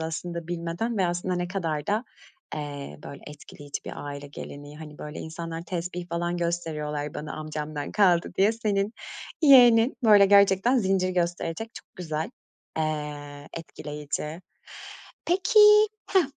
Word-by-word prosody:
aslında 165 +1 -4
bilmeden, 175 +7 -2
ve 185 - +3
aslında, 175 +1 -1
ne 175 0 -2
kadar 165 -6 -2
da, 215 +4 0 0.5
eee, 145 -2 -6
böyle, 140 - -9
etkileyici 145 -1 -8
bir - - -6
aile 145 0 -6
geleneği, 145 +1 -9
hani, 150 -2 -10
böyle, 150 0 -7
insanlar 165 +1 -6
tespih 175 0 -5
falan 175 +1 -2
gösteriyorlar 150 -4 -3
bana, 150 0 -5
amcamdan 155 -1 -5
kaldı 180 -5 +3
diye. 200 +3 +5
Senin 210 -2 -1 0.5
yeğenin, 245 -4 +7
böyle, 205 -3 +7
gerçekten 200 +5 +5
zincir 190 -3 +1
gösterecek, 175 +4 -2
çok - - -13
güzel. 160 -3 -3 0.5
Eee, 150 -2 -4
etkileyici. 150 +1 -6 0.8
Peki 370 +5 +3 0.5
hah, 380 -2 +4
170 Hz, 130 wpm, -26 LUFS, 150-195 Hz, 0.8 s, yeğenin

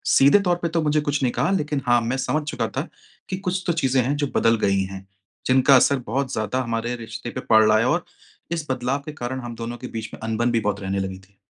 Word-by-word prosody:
सीधे 140 +9 +6
तौर 175 - +3
पे 170 - 0
तो 165 0 0
मुझे 150 0 +2
कुछ 145 0 -1
नहीं 125 - +2
कहा 140 +9 +1
लेकिन 150 -6 0
हाँ, 120 -1 +4
मैं 120 +3 -1
समझ 150 +3 -1
चुका - - -2
था - - -1 0.4
कि 185 - -2
कुछ 185 -1 -2
तो 170 - +2
चीज़ें 135 -4 +2
हैं, 135 +4 0
जो 145 0 -1
बदल 115 0 +4
गई 100 -1 +2
हैं, 95 0 -8 0.4
जिनका 130 +1 +5
असर 135 +1 +4
बहुत 130 +4 -1
ज़्यादा 110 +4 -1
हमारे 115 +1 -2
रिश्ते 115 0 -7
पे 130 - -5
पड़ 110 -1 +7
रहा 110 0 +5
है 115 - +2
और 170 +4 0 0.5
इस 165 -3 -3
बदलाव 130 +2 -1
के 155 - -5
कारण 130 -1 -4
हम 120 -1 -7
दोनों 115 +1 -5
के 125 - -7
बीच 110 -1 -6
में - - -9
अनबन 115 +2 0
भी 115 - +2
बहुत 105 -2 -1
रहने 95 0 -2
लगी 95 -1 -4
थी। 95 +1 -24
125 Hz, 255 wpm, -23 LUFS, 115-145 Hz, 0.5 s, पड़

